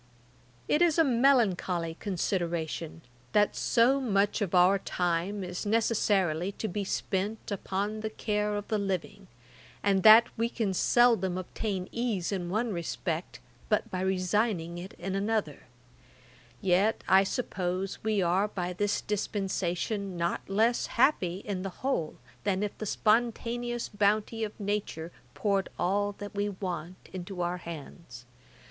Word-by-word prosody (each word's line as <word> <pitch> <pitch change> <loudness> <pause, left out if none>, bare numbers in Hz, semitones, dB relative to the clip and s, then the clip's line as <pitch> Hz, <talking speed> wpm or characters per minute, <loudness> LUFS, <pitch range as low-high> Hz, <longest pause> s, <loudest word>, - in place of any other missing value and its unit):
'It 300 - +2
is 345 -2 +4
a 325 - +6
melancholy 225 - +2
consideration, 170 -4 -2 0.3
that 210 0 +3
so 250 +4 +3
much 205 -3 +1
of 195 -3 0
our 185 +2 +5
time 180 +3 -1
is 180 0 -4
necessarily 200 -5 +1
to 220 - -4
be 205 +1 -2
spent 200 +3 -2
upon 200 +2 -2
the 220 0 -3
care 210 -1 -1
of 205 +1 -5
living, 195 -2 -2 0.6
and 195 -1 +3
that 220 +4 +9
we 230 +1 0
can 220 -5 -1
seldom 195 -3 +3
obtain 185 0 -3
ease 225 -7 -1
in 180 -3 -2
one 220 +3 0
respect 170 0 -3 0.3
but 210 - +1
by 185 - -2
resigning 185 -2 0
it 185 +2 -8
in 190 +2 -5
another; 200 -6 -1 1.0
yet 195 +4 +2
I 190 +1 +6
suppose 190 -3 -3
we 215 -3 +1
are 185 +4 +2
by 180 -3 -3
this 205 +3 0
dispensation 195 -1 -2
not 170 +2 -2
less 225 +5 +2
happy 195 - +2
in 195 -3 -3
the 195 - -3 0.2
whole, 170 - 0 0.3
than 195 0 0
if 205 - -3
the 215 - -3
spontaneous 240 +2 0
bounty 210 +2 +1
of 215 0 -5
Nature 200 -5 -3 0.2
poured 200 -2 0
all 205 +3 +1
that 205 0 -8
we 205 0 -1
want 180 -3 -5 0.2
into 185 0 -5
our 175 +1 -1
hands. 165 -6 -9
200 Hz, 140 wpm, -29 LUFS, 180-215 Hz, 1.0 s, that